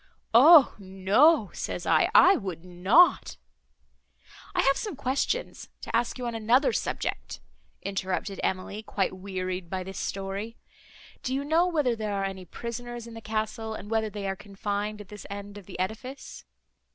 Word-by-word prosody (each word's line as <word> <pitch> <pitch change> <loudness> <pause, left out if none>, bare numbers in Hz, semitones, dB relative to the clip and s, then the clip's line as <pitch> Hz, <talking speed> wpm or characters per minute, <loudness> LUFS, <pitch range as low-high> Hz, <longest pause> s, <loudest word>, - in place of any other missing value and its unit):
'O 285 +4 +8
no,' 200 - +3
says 175 - -4
I, 160 -1 +3
'I 375 +2 +8
would 185 -5 -6
not—'" 185 - +4 1.2
"I - - +3
have 275 0 +4
some 420 -7 -4
questions 275 - -2
to - - -4
ask 235 +2 0
you 250 - -5
on 235 - -2
another 235 - +3
subject," - - -3 0.4
interrupted 195 0 -3
Emily, 190 +3 -2
quite 200 -3 -2
wearied 185 -2 -5
by 185 0 -3
this 190 +1 -7
story. 195 +4 -4 0.6
"Do 260 - -2
you 275 - -1
know 330 +4 +3
whether 295 -9 +1
there 215 -2 -3
are 195 0 -1
any 190 -1 -6
prisoners 240 +4 -6
in 230 - -10
the 225 - -9
castle, 220 +1 -3
and 205 0 -9
whether 220 -1 +1
they 205 -1 -5
are 195 - -2
confined 205 +1 -4
at 200 - -13
this 210 -1 -10
end 200 0 -7
of 195 - -17
the 195 - -8
edifice?" 225 +8 -5
210 Hz, 165 wpm, -27 LUFS, 195-240 Hz, 1.2 s, O